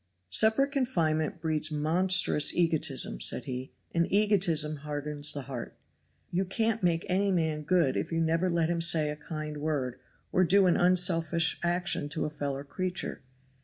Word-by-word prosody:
"Separate 220 - +3
confinement 170 - -1
breeds 155 -1 0
monstrous 160 +1 +3
egotism," 155 - +1
said - - +3
he, 130 +1 -6 0.2
"and 170 0 0
egotism 180 -7 +2
hardens 150 0 -1
the 145 - -5
heart. 125 -3 -8 0.5
You 180 +2 0
can't 220 +4 -1
make 170 -1 0
any 195 +2 0
man 160 -4 -1
good 160 -3 +1
if - - -3
you 165 - -1
never 165 +3 0
let 170 -2 0
him 170 0 -2
say 160 -2 +4
a - - -5
kind 155 0 -7
word 145 -5 -3 0.3
or 185 - +2
do 195 +2 +4
an 180 - +3
unselfish 170 -2 +2
action 175 -3 0
to 155 - -3
a 150 - -4
fellow 140 -2 -5
creature. 185 +4 -4
165 Hz, 160 wpm, -28 LUFS, 150-180 Hz, 0.5 s, say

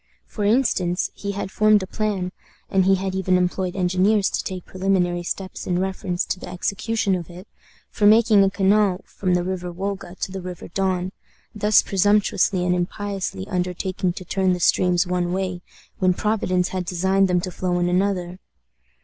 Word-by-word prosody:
For 210 - -5
instance, 205 -6 +1
he 200 0 -5
had 195 -1 -4
formed 215 -2 +4
a - - -3
plan 195 -2 -2 0.4
and 190 -1 +3
he 195 0 +5
had 190 0 -3
even 190 -1 +2
employed 180 0 -1
engineers 190 +3 +2
to - - -1
take 185 -2 -6
preliminary 185 -2 0
steps 185 +2 -5
in 180 - +1
reference 185 -1 -2
to 185 - -3
the - - -8
execution 200 +3 -1
of 175 -2 -3
it 180 +3 -11 0.4
for 205 - +2
making 215 -1 +6
a 195 - +3
canal 200 -1 +2
from 185 -2 -1
the 175 - +1
River 180 -1 -4
Wolga 190 0 -5
to - - -2
the 190 0 -5
River 180 -1 -8
Don, 185 0 -1 0.4
thus 210 0 +4
presumptuously 200 -2 +2
and 180 - +2
impiously 185 - -3
undertaking 180 0 -2
to 185 -1 -9
turn 190 0 +1
the 180 - -3
streams 180 +1 +3
one 180 -1 -1
way, 185 -2 -2 0.4
when 185 -1 +3
Providence 185 -4 0
had 185 -1 -3
designed 190 +2 +2
them 180 -1 +2
to 180 +1 -4
flow 180 0 -1
in 175 0 +1
another! 180 -1 0
185 Hz, 175 wpm, -22 LUFS, 180-195 Hz, 0.4 s, making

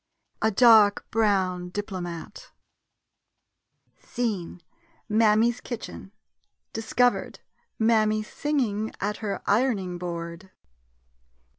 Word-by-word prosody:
] - - -52
& - - -46
A 220 - +3
DARK 220 -2 +5
BROWN 190 -5 +1
DIPLOMAT 180 -4 -6 1.5
Scene 205 -8 -4 0.3
— 330 -1 -35
Mammy's 220 +2 +3
kitchen. 230 -5 -7 0.6
Discovered 245 +2 0 0.2
— - - -44
Mammy 215 -1 +2
singing 220 -5 -2
at 205 +1 -2
her 205 -3 -4
iron 240 +2 +2
ing 180 -2 -6
board. 170 +1 -6
210 Hz, 100 wpm, -26 LUFS, 185-230 Hz, 1.5 s, DARK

